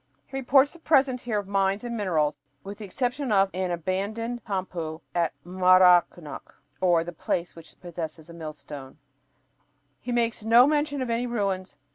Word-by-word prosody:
He 270 - -11
reports 270 +2 +4
the 340 - -15
presence 270 -5 +2
here 225 -3 0
of 205 -2 -3
mines 195 +2 +1
and 240 -1 -4
minerals, 160 -8 0 0.2
but 195 - -8
with 200 - -7
the 215 - -6
exception 250 +5 -2
of 195 -1 +3
an 185 0 -2
"abandoned 200 +7 -3
tampu" 180 -5 -4
at 170 -2 +1
Maracnyoc 180 -3 +3 0.5
("the 175 -1 -7
place 170 +2 -2
which 165 -1 -15
possesses 165 -2 -7
a 170 - -11
millstone"), 150 -4 -9 1.0
he 245 - -5
makes 235 -2 0
no 230 +3 +7
mention 290 -2 0
of 240 - -3
any 235 +2 0
ruins. 195 -8 -2
195 Hz, 160 wpm, -26 LUFS, 175-240 Hz, 1.0 s, no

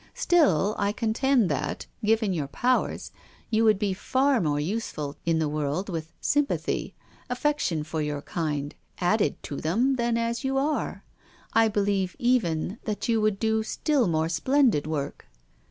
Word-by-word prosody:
Still 215 - +3
I 200 0 +1
contend 235 +1 +2
that, 140 0 -2 0.2
given 215 -2 +2
your 150 -5 -2
powers, 250 - 0 0.4
you 220 0 +3
would 215 -2 +5
be 200 -1 0
far 260 +6 +1
more 145 -3 0
useful 155 -5 -3
in 165 -1 +3
the 160 -1 +1
world 150 +6 -2
with 165 -2 -4
sympathy, 290 0 0 0.3
affection 250 - 0
for 155 +1 -3
your 150 -1 -3
kind, 150 -4 -3 0.2
added 205 +5 +2
to 140 - -5
them 240 +12 +1
than 235 -1 +1
as 235 0 -1
you 270 0 0
are. 295 +3 -1 0.5
I 225 0 +5
be 210 -1 0
lieve 195 -2 0
even 220 -5 0
that 215 0 -3
you 225 -1 +3
would 215 -2 +2
do 220 +1 +1
still 265 +2 +1
more 160 -1 +1
splendid 215 - +2
work." 145 -3 -4
205 Hz, 155 wpm, -26 LUFS, 160-240 Hz, 0.5 s, would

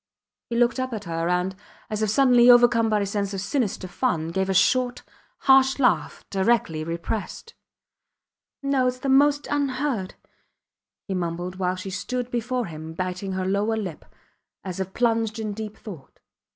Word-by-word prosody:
He 235 - -3
looked 240 +2 +2
up 255 -1 -2
at 215 -2 -4
her, 165 -1 -2
and, 180 +1 0 0.3
as 215 0 -3
if 215 - +1
suddenly 245 +1 +5
overcome 240 -2 +6
by 210 -1 +2
a - - 0
sense 200 0 -2
of - - -3
sinister 200 -3 -2
fun, 175 -5 -1
gave 190 +3 -1
a - - +2
short, 250 +5 +2 0.4
harsh 265 0 +5
laugh, 250 -4 +1
directly 190 -6 +1
repressed. 170 - -5 1.1
No! 275 -2 +2
Its 250 0 -1
the 270 +2 -3
most 285 +2 +4
unheard!... 270 -7 -1 0.9
he 195 - -2
mumbled 175 0 -3
while 185 -1 0
she 185 +1 -6
stood 245 +6 -3
before 245 +1 -1
him 160 -1 -8
biting 185 +2 -3
her 185 0 -2
lower 205 +4 0
lip, 185 -8 -5 0.6
as 185 -1 -6
if 190 0 -3
plunged 225 -2 +1
in 215 -2 -3
deep 215 0 -7
thought. 170 -11 -11
215 Hz, 165 wpm, -24 LUFS, 185-250 Hz, 1.1 s, overcome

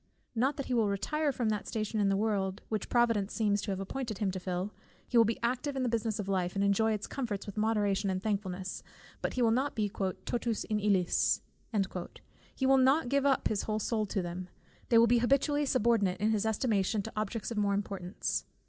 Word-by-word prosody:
Not 260 +5 +1
that 275 - -3
he 255 - -2
will 225 -4 +3
retire 290 +10 0
from 240 -4 -1
that 210 -1 -2
station 215 0 -2
in 200 -1 +3
the 195 - +2
world 200 -2 -1
which 215 -1 -2
Providence 230 -4 +2
seems 205 -3 +2
to 210 - -5
have 190 -1 -2
appointed 220 +2 -4
him 195 -1 0
to 185 - -4
fill: 185 +2 -3 0.3
he - - -5
will 230 -1 +7
be 225 +1 0
active 255 +4 -1
in 265 - -1
the 250 - +1
business 225 -2 -1
of 205 - -4
life, 185 -2 0
and 195 - +1
enjoy 200 +3 +3
its 210 -1 -2
comforts 230 -7 -4
with 205 - -7
moderation 210 -2 +1
and 185 0 -2
thankfulness; 190 -3 -3 0.4
but - - -1
he 250 - +2
will 225 - +4
not 265 +5 0
be 210 -3 0
"totus 215 +4 -2
in 215 -1 -1
illis," 195 -4 +2 1.1
he 265 - 0
will 270 0 +6
not 265 +1 +4
give 280 +1 +2
up 270 - +2
his 210 -2 0
whole 215 -1 -2
soul 215 0 -1
to 195 -1 -1
them, 175 +1 -5 0.4
they 230 - +5
will 230 - +8
be 240 +1 +4
habitually 280 +4 +2
subordinate 220 -7 +2
in 215 +2 +2
his 215 0 +1
estimation 215 -2 +1
to 225 - -7
objects 215 +1 -3
of 220 - -1
more 200 -1 +2
importance. 195 -2 -3
215 Hz, 220 wpm, -31 LUFS, 195-240 Hz, 1.1 s, will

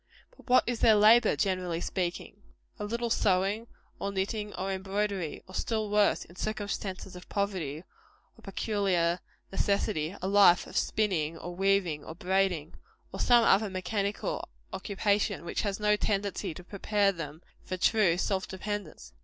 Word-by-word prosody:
But - - -19
what 255 - +6
is 240 -2 -2
their 220 -2 +6
labor, 215 +3 +6
generally 185 -4 -1
speaking? 180 +3 -3 0.4
A 210 - -3
little 235 +2 -2
sewing, 200 +3 +1 0.3
or 200 - -2
knitting, 205 +2 -2
or 190 +1 -2
embroidery; 195 -2 -2
or 185 - -13
still 215 0 -2
worse, 210 -1 +3
in 175 - -17
circumstances 200 -3 -4
of 180 - -12
poverty 180 -7 -2 0.5
or - - -19
peculiar 190 -4 0 0.3
necessity, 195 -4 0
a 185 - -3
life 195 -3 +6
of - - -12
spinning, 170 -7 0
or 175 +1 -7
weaving, 190 -5 +1
or 160 - -8
braiding; 180 -3 0 0.4
or - - -6
some 240 -1 +5
other 205 -1 +4
mechanical 200 - -2 0.2
occupation 205 -2 0
which - - -2
has 200 -1 -2
no 210 0 +3
tendency 200 -4 -2
to 180 - -9
prepare 200 +1 +1
them 160 -3 -7 0.2
for 185 - -4
true 185 -3 +3
self 190 0 -1
dependence. 205 +2 -6
195 Hz, 150 wpm, -29 LUFS, 180-210 Hz, 0.5 s, what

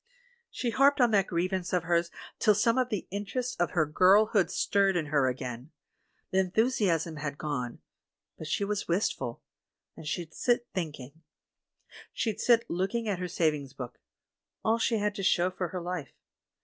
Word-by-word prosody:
"She 240 - -2
harped 280 +3 +4
on 245 -2 +5
that 200 -2 +3
grievance 180 +1 -1
of 180 -2 +2
hers 170 0 +1 0.3
till 210 -2 +4
some 230 +3 +3
of 250 -1 +1
the 210 -5 -3
interests 205 +6 -3
of 175 - +1
her 165 -4 +2
girlhood 195 +6 +4
stirred 195 -1 +2
in 160 - -1
her 140 -3 +4
again. 125 +1 -4 0.6
The 190 - +2
enthusiasm 185 -5 +1
had 145 -1 -4
gone, 130 -6 -4 0.5
but 160 - -8
she 200 - 0
was 205 0 -2
wistful. 170 - -1 0.5
And 155 - -10
she'd 160 +1 -4
sit 240 -1 +1
thinking. 155 -4 -5 0.9
She'd 220 -3 -2
sit 235 -1 +4
look 190 +5 -2
ing 230 -1 -1
at 195 -4 -1
her 180 - -2
savings 150 -6 -1
book 125 -2 -8 0.3
— - - -38
all 225 +1 +3
she 230 0 +1
had 210 0 0
to 205 - -5
show 180 0 +3
for 185 -1 -3
her 180 - -5
life. 175 -5 -5
185 Hz, 175 wpm, -29 LUFS, 160-210 Hz, 0.9 s, on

